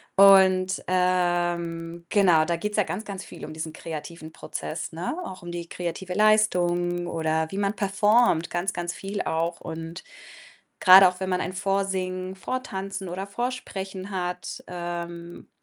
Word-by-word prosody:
und, 190 -1 +6
ähm, 175 -2 0
genau, 175 -6 +4
da 170 +1 0
geht's 210 +5 -3
ja 210 - +4
ganz, 195 +3 -4
ganz 195 -3 -6
viel - - -11
um - - -8
diesen 160 0 -5
kreativen 160 0 -7
Prozess, 160 +1 -6
ne, 170 +3 -3
auch 185 - -8
um 175 0 -7
die 170 0 -5
kreative 180 +2 -5
Leistung 175 -4 +2
oder 160 -1 0
wie 195 - -5
man 200 +1 0
performt, 200 -2 +3
ganz, 175 +2 -1
ganz 175 0 -4
viel 200 +1 -4
auch 165 +1 -1
und 165 +1 -7 0.8
grade 190 0 +9
auch, 180 +1 -10
wenn 190 - -2
man 180 -1 0
ein 185 - -3
Vorsingen, 190 -1 -1
Vortanzen 195 -4 -4
oder 185 +3 -4
Vorsprechen 200 -4 -5
hat, 180 -1 -4
ähm, 170 -1 -6
180 Hz, 150 wpm, -25 LUFS, 170-195 Hz, 0.8 s, grade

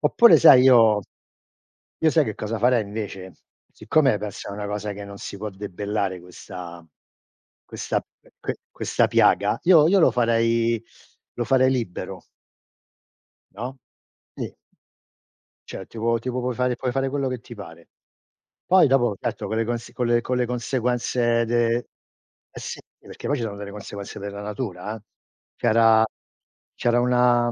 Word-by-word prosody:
oppure 235 -1 +6
sai, 130 -6 +8
io 115 -5 +6 1.0
io 160 -1 +4
sai 155 -2 +3
che 110 - -4
cosa 110 +1 -4
farei, 120 0 +3
invece? 100 -3 -7 0.4
Siccome 135 -9 +2
questa 105 0 -7
è - - -6
una 105 +1 -5
cosa 105 0 -4
che 100 0 -8
non 100 0 -10
si - - -7
può 105 +2 -5
debellare 100 -1 -4
questa 90 -1 -10 0.8
questa - - -3 0.4
que - - -4
questa - - 0
piaga, - - +3
io 165 -4 +6
io 195 +2 +4
lo 145 - +5
farei 115 -1 +1 0.5
lo 120 - -2
farei 130 +1 +3
libero 115 -9 -4 1.3
No? 130 +2 -6 0.6
Sì. - - -6 1.1
Cioè, 95 - -7
tipo 115 +1 -1
tipo 125 +2 -3
puoi 125 0 -2
fare 125 0 0
puoi 125 - -2
fare 135 +1 -1
quello 135 0 -1
che 130 -1 -4
ti 120 - -12
pare. 85 -5 -12 0.8
Poi 185 -4 +5
dopo, 120 -6 +2
certo - - -4
con 110 - -2
le 115 - 0
cons 120 0 -4
con 120 0 0
le 125 - +1
conseguenze 120 -1 0
de 115 0 +1 0.8
eh - - -7
sì, - - -6 0.2
perché - - -9
poi 145 - +1
ci 120 - -3
sono 100 -2 -5
delle 100 0 -7
conseguenze 100 -1 -8
della 100 0 -6
natura 105 -1 -5
eh. 110 - -12 0.5
C'era 110 0 +4 0.7
c'era 120 0 +1
una 125 -1 +3
115 Hz, 150 wpm, -23 LUFS, 105-125 Hz, 1.3 s, sai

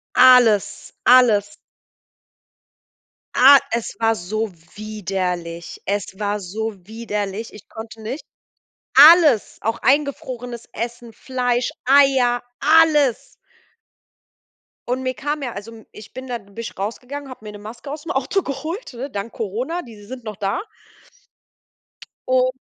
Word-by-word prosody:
Alles, 245 -5 +5
alles. 210 -5 +5 1.8
Ah, 275 +2 +9
es 235 -1 -3
war 225 0 +2
so 215 +3 -3 0.3
widerlich. 185 -5 -4
Es 200 -1 -3
war 210 0 -2
so 215 +4 -4
widerlich, 210 -1 -4
ich 210 - -14
konnte 220 0 -10
nicht. 255 +7 -5 0.7
Alles, 300 - +7
auch 225 +2 -2
eingefrorenes 255 -4 -1
Essen, 235 +1 -6
Fleisch, 245 +1 -1
Eier, 265 -3 +4 0.2
alles. 300 -4 +3 1.5
Und 250 +2 -1
mir 255 0 -2
kam 295 +5 -3
ja 245 -4 -4
also 205 +3 -8
m 225 -1 -14
ich 215 +1 -13
bin 260 0 -8
da 245 -1 -3
bin 200 -3 -20
ich 230 0 -6
rausgegangen, 250 +8 -5
habe 255 -4 -11
mir 210 - -7
'ne 210 - -10
Maske 225 +6 -9
ausm 305 +2 -6
Auto 280 +9 0
geholt, 310 - -5
ne, 255 +4 -6
dank 205 -1 -6
Corona, 245 - -3
diese 215 -6 -13
sind 255 +1 -8
noch 215 -2 -6
da. 200 - -2 1.7
Und, 255 0 +3
235 Hz, 125 wpm, -21 LUFS, 210-260 Hz, 1.8 s, Ah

